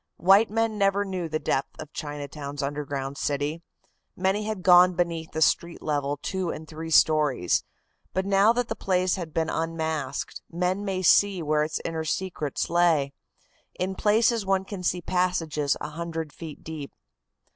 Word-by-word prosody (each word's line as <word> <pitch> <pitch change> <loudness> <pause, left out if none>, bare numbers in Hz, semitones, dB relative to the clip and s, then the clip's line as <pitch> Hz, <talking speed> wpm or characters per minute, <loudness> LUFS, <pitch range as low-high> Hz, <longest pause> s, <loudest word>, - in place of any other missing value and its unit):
White 195 +5 +5
men 225 0 0
never 200 0 +2
knew 185 -4 -3
the 155 - 0
depth 140 -2 -2
of 155 -1 -9
Chinatown's 145 -1 -5
underground 140 -1 -4
city. 145 +3 -1 0.5
Many 190 +3 0
had 215 -4 -4
gone 180 0 +7
beneath 170 -2 -1
the 160 - +2
street 170 +2 +1
level 145 -1 -1
two 190 -2 -2
and 155 -1 -6
three 160 +2 -7
stories, 150 - +3 0.5
but 190 0 -1
now 200 +2 +5
that 245 0 0
the - - -3
place 185 -1 +1
had 170 -4 -4
been 160 +1 -1
unmasked, 160 -3 -3
men 180 +3 -1
may 190 -2 -2
see 190 0 +4
where 150 0 +2
its 155 +1 -1
inner 165 -1 -2
secrets 160 -3 -2
lay. 165 -5 +2 0.7
In 185 +1 -1
places 225 +3 +2
one 195 0 +1
can 195 -2 -6
see 180 0 0
passages 165 -6 0
a 150 - -5
hundred 160 -1 -5
feet 160 -3 -9
deep. 155 -3 -7
165 Hz, 160 wpm, -26 LUFS, 150-190 Hz, 0.7 s, gone